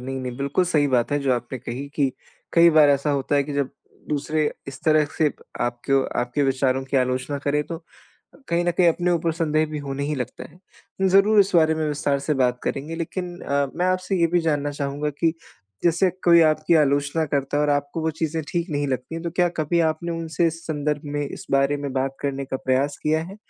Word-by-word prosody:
नहीं-नहीं 130 -1 -5
बिल्कुल 140 +6 0
सही 155 -5 +2
बात 125 +1 +1
है 145 - +2
जो 135 -2 +1
आपने 120 +1 -3
कही 125 +5 -6
कि 135 -3 +1 0.4
कई 170 0 +7
बार 155 -2 +6
ऐसा 140 +1 +1
होता 140 0 0
है 140 - +3
कि 145 - -6
जब 140 -2 0 0.4
दूसरे 150 +1 0 0.2
इस 135 - -8
तरह 155 -1 +4
से 155 -2 +3 0.3
आपको 120 +3 +1 0.2
आपके 125 +4 -1
विचारों 135 -1 +1
की 135 +1 -2
आलोचना 130 +2 0
करें 145 +1 0
तो, 165 +1 -6 0.7
कहीं 170 +1 +1
न 175 - +2
कहीं 175 0 +3
अपने 175 +2 +1
ऊपर 165 -1 0
संदेह 155 -1 +1
भी 155 - -4
होने 140 -1 -4
ही 150 +1 -1
लगता 125 -3 -5
है। 190 +1 -5
ज़रूर 200 +3 +5
इस 195 0 +2
बारे 160 -1 +4
में 155 -1 -1
विस्तार 145 -1 0
से 150 +2 -1
बात 125 -2 +1
करेंगे, 150 +4 -3
लेकिन 175 +1 -5
अ, 140 0 0
मैं 180 - +1
आपसे 185 +1 0
ये 170 - +5
भी 175 +1 +1
जानना 145 -3 0
चाहूँगा 145 +1 -3
कि 160 +3 0 0.5
जैसे 175 +2 +3
कोई 170 -1 +7
आपकी 155 +1 +3
आलोचना 145 +1 +2
करता 140 0 -1
है 150 - +2
और 150 - +2
आपको 145 +2 -1
वो 160 - +1
चीज़ें 160 0 -1
ठीक 175 0 -2
नहीं 145 -1 -1
लगती 130 +4 -3
हैं 165 - -5
तो 170 - -2
क्या 175 +1 +2
कभी 165 +2 +1
आपने 170 +2 -4
उनसे 165 0 -1
इस 165 0 -2
संदर्भ 150 -1 -1
में, 145 0 -3
इस - - -9
बारे 140 +1 +3
में 140 -2 -5
बात 135 0 -1
करने 140 -1 -2
का 130 0 -3
प्रयास 135 +3 0
किया 155 +1 +1
है? 195 +4 -10
150 Hz, 220 wpm, -23 LUFS, 140-165 Hz, 0.7 s, कई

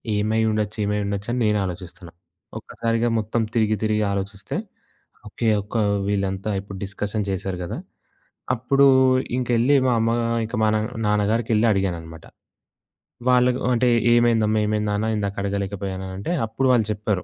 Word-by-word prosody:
ఏమై 110 +2 +1
ఉండొచ్చు, 105 -1 -2
ఏమై 105 0 0
ఉండొచ్చు, 100 0 -3
అని 125 - -1
నేను 105 0 +2
ఆలోచిస్తున్నా. 90 -1 -8 0.5
ఒక్కసారిగా 115 0 -1
మొత్తం 110 +2 -1
తిరిగి 110 -2 +2
తిరిగి 110 0 +1
ఆలోచిస్తే, 100 +1 -4 0.7
ఓకే. 115 +2 -3
ఒక్క 105 +4 -5 0.3
వీళ్ళంతా 100 0 -1
ఇప్పుడు 100 0 -9
డిస్కషన్ 105 +2 -3
చేశారు 95 -1 -3
గదా! 85 - -5 0.8
అప్పుడు 135 +3 +3 0.5
ఇంకెళ్ళి 125 +2 +2
మా - - +3
అమ్మ 115 +1 +1 0.3
ఇంక 115 +3 -5
మా - - +4
న - - +3 0.3
నాన్నగారికేళ్లి 105 +2 +2
అడిగానన్నమాట. 85 -5 -3 1.0
వాళ్ళ 125 0 +5 0.3
అంటే 125 +1 +2 0.3
ఏమైందమ్మా, 115 -2 +3
ఏమైంది 105 0 0
నాన్న, 105 +1 -1
ఇందాక 100 -1 -2
అడగలేకపోయానంటే 100 - -4
అప్పుడు 130 +4 -1
వాళ్ళు 120 -4 +3
జెప్పారు. 105 -2 -2
105 Hz, 130 wpm, -23 LUFS, 100-115 Hz, 1.0 s, వాళ్ళ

